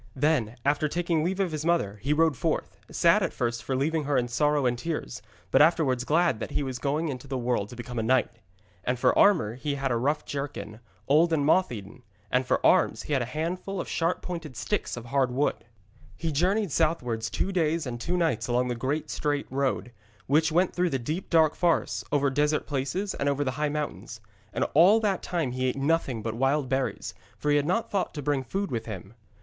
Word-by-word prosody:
Then, 130 Hz, -5 st, +1 dB
after 150 Hz, +2 st, +2 dB
taking 170 Hz, 0 st, 0 dB
leave 185 Hz, +3 st, -1 dB
of 190 Hz, -4 st, +1 dB
his 155 Hz, -1 st, -3 dB
mother, 160 Hz, -12 st, 0 dB
he 135 Hz, +6 st, -1 dB
rode 160 Hz, 0 st, +3 dB
forth, 155 Hz, -, -2 dB
sad 170 Hz, +5 st, +4 dB
at 185 Hz, -, -1 dB
first 120 Hz, -2 st, -2 dB
for 135 Hz, -, -2 dB
leaving 155 Hz, +3 st, 0 dB
her 145 Hz, -1 st, +1 dB
in 120 Hz, -, +1 dB
sorrow 145 Hz, +3 st, +2 dB
and 120 Hz, -1 st, +2 dB
tears, 150 Hz, -, -4 dB, 0.3 s
but -, -, +5 dB
afterwards 150 Hz, -6 st, +3 dB
glad 165 Hz, -5 st, +2 dB
that -, -, -4 dB
now -, -, -10 dB
he -, -, +1 dB
was 130 Hz, -2 st, -4 dB
going 150 Hz, +3 st, -1 dB
into 130 Hz, 0 st, -6 dB
the 135 Hz, -1 st, -3 dB
world 120 Hz, -4 st, -1 dB
to -, -, -10 dB
become 120 Hz, 0 st, -5 dB
a -, -, +1 dB
knight. 130 Hz, +3 st, +2 dB, 0.5 s
And 125 Hz, +1 st, 0 dB
for -, -, +3 dB
armour 165 Hz, -, +4 dB
he 140 Hz, +4 st, -3 dB
had 135 Hz, -1 st, -1 dB
a -, -, +2 dB
rough 145 Hz, +5 st, 0 dB
jerkin, 140 Hz, -6 st, -5 dB, 0.3 s
old 160 Hz, +4 st, +4 dB
and 150 Hz, -3 st, +2 dB
moth 180 Hz, +2 st, +3 dB
eaten, 110 Hz, +2 st, -8 dB, 0.3 s
and 125 Hz, 0 st, +1 dB
for -, -, +1 dB
arms -, -, +3 dB
he 150 Hz, -, -3 dB
had 135 Hz, -, +2 dB
a -, -, -1 dB
handful 175 Hz, +8 st, -3 dB
of -, -, -4 dB
sharp 165 Hz, +1 st, -1 dB
pointed 165 Hz, -8 st, -6 dB
sticks 210 Hz, -11 st, -2 dB
of 120 Hz, -, -7 dB
hard 135 Hz, +1 st, +1 dB
wood. 130 Hz, 0 st, -1 dB, 0.5 s
He 165 Hz, -1 st, -2 dB
journeyed 185 Hz, +5 st, +1 dB
southwards 125 Hz, -9 st, 0 dB
two 190 Hz, -, -2 dB
days 165 Hz, -3 st, 0 dB
and 120 Hz, -2 st, -5 dB
two 175 Hz, +7 st, -1 dB
nights 165 Hz, -10 st, 0 dB
along 125 Hz, +1 st, +1 dB
the -, -, 0 dB
great 135 Hz, +6 st, -2 dB
straight 145 Hz, -1 st, -1 dB
road, 135 Hz, -2 st, -1 dB, 0.3 s
which 155 Hz, +3 st, +3 dB
went 175 Hz, +3 st, +2 dB
through 180 Hz, 0 st, +1 dB
the 135 Hz, -, 0 dB
deep 155 Hz, +9 st, -4 dB
dark 160 Hz, -2 st, +4 dB
forests, 175 Hz, -2 st, 0 dB
over 140 Hz, -1 st, +2 dB
desert 150 Hz, +2 st, +1 dB
places 145 Hz, +9 st, -2 dB
and 140 Hz, -, -1 dB
over 140 Hz, +1 st, 0 dB
the 130 Hz, -, -1 dB
high 150 Hz, +3 st, -1 dB
mountains. 145 Hz, -6 st, -4 dB, 0.3 s
And -, -, 0 dB
all 185 Hz, +9 st, +6 dB
that 200 Hz, -4 st, 0 dB
time 165 Hz, -8 st, -2 dB
he 130 Hz, +1 st, -1 dB
ate 130 Hz, -, -1 dB
nothing 135 Hz, -5 st, 0 dB
but 115 Hz, -1 st, -2 dB
wild 135 Hz, +3 st, +1 dB
berries, 135 Hz, 0 st, -2 dB, 0.2 s
for 150 Hz, -, 0 dB
he 145 Hz, -, +4 dB
had 145 Hz, 0 st, 0 dB
not 225 Hz, +6 st, 0 dB
thought 195 Hz, -4 st, -1 dB
to 145 Hz, -, -5 dB
bring 140 Hz, -1 st, 0 dB
food 195 Hz, +10 st, -3 dB
with 115 Hz, -2 st, -3 dB
him. 95 Hz, -1 st, -7 dB
145 Hz, 220 wpm, -27 LUFS, 125-165 Hz, 0.5 s, all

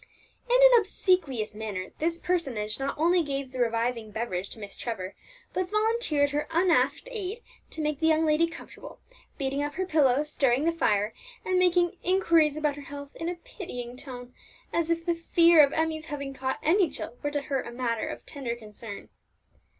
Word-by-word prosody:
In -, -, +4 dB
an -, -, +8 dB
obsequious 335 Hz, -, 0 dB
manner 210 Hz, -4 st, -5 dB
this 330 Hz, +2 st, 0 dB
personage 260 Hz, -13 st, -1 dB
not 270 Hz, +1 st, -2 dB
only 345 Hz, +3 st, +4 dB
gave 275 Hz, -3 st, -3 dB
the 260 Hz, -, -6 dB
reviving 230 Hz, -1 st, 0 dB
beverage 205 Hz, -4 st, -3 dB
to -, -, -8 dB
Miss 205 Hz, -1 st, -8 dB
Trevor, 195 Hz, -6 st, -4 dB, 0.4 s
but 365 Hz, -1 st, -1 dB
volunteered 425 Hz, -9 st, +1 dB
her 295 Hz, +1 st, -1 dB
unasked 340 Hz, +7 st, +2 dB
aid 435 Hz, 0 st, -5 dB, 0.3 s
to 320 Hz, -, -6 dB
make 300 Hz, -2 st, -1 dB
the 320 Hz, -, +2 dB
young 320 Hz, 0 st, +4 dB
lady 310 Hz, +2 st, +3 dB
comfortable, 330 Hz, -, -11 dB, 0.4 s
beating 275 Hz, 0 st, -1 dB
up 290 Hz, 0 st, -3 dB
her 375 Hz, -, -1 dB
pillow, 295 Hz, -5 st, +3 dB
stirring 275 Hz, -3 st, +1 dB
the 335 Hz, -, +4 dB
fire, 215 Hz, -10 st, +1 dB, 0.3 s
and 370 Hz, -1 st, +2 dB
making 355 Hz, -1 st, +3 dB
inquiries 335 Hz, -5 st, +3 dB
about 300 Hz, -2 st, 0 dB
her -, -, -7 dB
health 285 Hz, 0 st, -9 dB
in 330 Hz, -, -3 dB
a 355 Hz, -, -3 dB
pitying 335 Hz, -, -8 dB
tone, 250 Hz, -2 st, -9 dB, 0.4 s
as 335 Hz, -1 st, 0 dB
if 335 Hz, 0 st, 0 dB
the 345 Hz, -, +2 dB
fear 335 Hz, -1 st, +6 dB
of 280 Hz, -, +3 dB
Emmie's 320 Hz, 0 st, -1 dB
having 280 Hz, -3 st, -5 dB
caught 260 Hz, 0 st, -2 dB
any 350 Hz, +2 st, +4 dB
chill 240 Hz, -3 st, -7 dB
were 290 Hz, -, -1 dB
to 290 Hz, 0 st, -1 dB
her 270 Hz, -2 st, -1 dB
a -, -, -8 dB
matter 235 Hz, -2 st, -2 dB
of -, -, -7 dB
tender 260 Hz, -5 st, -4 dB
concern. 215 Hz, -2 st, -9 dB
295 Hz, 185 wpm, -27 LUFS, 245-335 Hz, 0.4 s, an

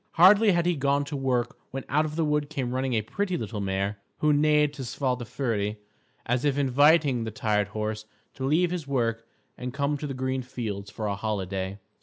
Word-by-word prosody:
Hardly 200 Hz, +4 st, +7 dB
had 170 Hz, -1 st, +1 dB
he 175 Hz, -1 st, +2 dB
gone 140 Hz, 0 st, +1 dB
to 145 Hz, -, -5 dB
work 125 Hz, -3 st, -1 dB
when 135 Hz, 0 st, -5 dB
out 155 Hz, +3 st, +2 dB
of 155 Hz, 0 st, -5 dB
the 165 Hz, -1 st, +1 dB
wood 150 Hz, -1 st, 0 dB
came 130 Hz, -5 st, -3 dB
running 130 Hz, -1 st, 0 dB
a 110 Hz, -, +1 dB
pretty 185 Hz, -, -2 dB
little 110 Hz, -5 st, -4 dB
mare, 100 Hz, +1 st, -1 dB, 0.2 s
who 150 Hz, 0 st, +3 dB
neighed 150 Hz, 0 st, +3 dB
to 140 Hz, -, -7 dB
Svadilföri 120 Hz, -4 st, -2 dB, 0.5 s
as 125 Hz, +1 st, 0 dB
if 145 Hz, -2 st, +1 dB
inviting 145 Hz, -1 st, +4 dB
the 110 Hz, -, -3 dB
tired 105 Hz, -1 st, 0 dB
horse 110 Hz, +1 st, -4 dB, 0.3 s
to 135 Hz, -, -7 dB
leave 165 Hz, +6 st, +2 dB
his 170 Hz, -5 st, -4 dB
work 115 Hz, -4 st, -1 dB, 0.3 s
and 125 Hz, +1 st, -5 dB
come 140 Hz, +1 st, 0 dB
to 150 Hz, -, -4 dB
the 135 Hz, -, -4 dB
green 130 Hz, 0 st, -1 dB
fields 110 Hz, -5 st, -5 dB
for 110 Hz, -, -5 dB
a 100 Hz, -, 0 dB
holiday. 95 Hz, -2 st, -3 dB
130 Hz, 200 wpm, -27 LUFS, 110-150 Hz, 0.5 s, Hardly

